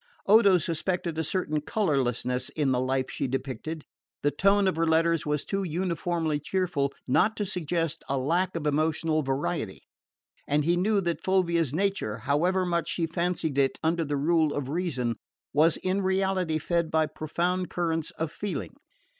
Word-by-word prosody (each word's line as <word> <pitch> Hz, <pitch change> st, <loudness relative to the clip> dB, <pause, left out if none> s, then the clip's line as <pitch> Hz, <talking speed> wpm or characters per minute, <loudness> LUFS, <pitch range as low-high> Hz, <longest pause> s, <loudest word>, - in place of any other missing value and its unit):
Odo 200 Hz, -2 st, +6 dB
suspected 170 Hz, 0 st, -2 dB
a -, -, +1 dB
certain 155 Hz, -3 st, -1 dB
colourlessness 130 Hz, -, 0 dB
in 145 Hz, -4 st, 0 dB
the 125 Hz, -, +2 dB
life 130 Hz, 0 st, 0 dB
she 140 Hz, -, -2 dB
depicted. 135 Hz, +4 st, -4 dB, 0.4 s
The 145 Hz, -, +3 dB
tone 195 Hz, +5 st, +3 dB
of 190 Hz, -, +1 dB
her 165 Hz, +1 st, +1 dB
letters 165 Hz, -1 st, +2 dB
was 150 Hz, -1 st, 0 dB
too 195 Hz, 0 st, -1 dB
uniformly 170 Hz, -3 st, -1 dB
cheerful 160 Hz, -4 st, -1 dB, 0.2 s
not 210 Hz, -, +3 dB
to 210 Hz, -, -1 dB
suggest 170 Hz, -3 st, -2 dB
a 140 Hz, -, +1 dB
lack 175 Hz, +8 st, 0 dB
of 165 Hz, -2 st, -3 dB
emotional 155 Hz, +1 st, +1 dB
variety; 135 Hz, -, -2 dB, 0.6 s
and 145 Hz, 0 st, +1 dB
he 170 Hz, +2 st, +3 dB
knew 200 Hz, +3 st, +2 dB
that 170 Hz, -2 st, -2 dB
Fulvia's 170 Hz, -6 st, +1 dB
nature, 180 Hz, -, -1 dB
however 160 Hz, +10 st, +1 dB
much 170 Hz, -1 st, -1 dB
she 170 Hz, -, 0 dB
fancied 165 Hz, -3 st, -1 dB
it 135 Hz, -1 st, +2 dB
under 165 Hz, +1 st, +1 dB
the 145 Hz, -1 st, -2 dB
rule 155 Hz, +1 st, +2 dB
of 135 Hz, -2 st, -3 dB
reason, 135 Hz, -9 st, -1 dB, 0.4 s
was 155 Hz, +3 st, +4 dB
in 185 Hz, +2 st, -1 dB
reality 190 Hz, -3 st, +1 dB
fed 170 Hz, +1 st, 0 dB
by 160 Hz, 0 st, +2 dB
profound 170 Hz, +4 st, -2 dB
currents 165 Hz, -2 st, -1 dB
of 160 Hz, -1 st, -2 dB
feeling. 200 Hz, +3 st, -4 dB
165 Hz, 165 wpm, -27 LUFS, 145-180 Hz, 0.6 s, Odo